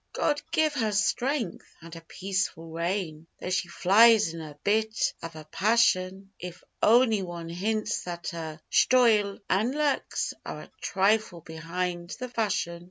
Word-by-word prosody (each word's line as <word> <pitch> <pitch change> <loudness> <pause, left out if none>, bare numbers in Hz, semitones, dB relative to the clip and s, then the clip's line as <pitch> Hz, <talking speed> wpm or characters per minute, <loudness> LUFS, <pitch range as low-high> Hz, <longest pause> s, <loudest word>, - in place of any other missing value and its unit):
'God 295 -1 0
give 315 -2 +1
her 225 -6 0
strength! 235 - -1
and 165 0 -11
a 165 - -9
peaceful 185 -2 -3
reign 165 -1 -3
Though 180 - -5
she 185 -1 0
flies 210 +2 +5
in 165 - -7
a 150 -2 -10
bit 215 +1 +1
av 165 -1 -8
a 155 - -9
passion 195 -1 +1
If 180 0 -8 0.2
ony 225 -2 +4
wan 170 -2 -6
hints 215 +5 -2
that 175 -1 -5
her 160 -2 -6
shtoyle 220 -6 +4
an' 215 +7 +1
luks 295 -2 -1
Are - - -7
a - - -14
trifle 195 -2 +1
behind 175 +2 -4
the 255 -1 -5
fashion. 210 -7 -1
195 Hz, 150 wpm, -27 LUFS, 170-220 Hz, 0.2 s, flies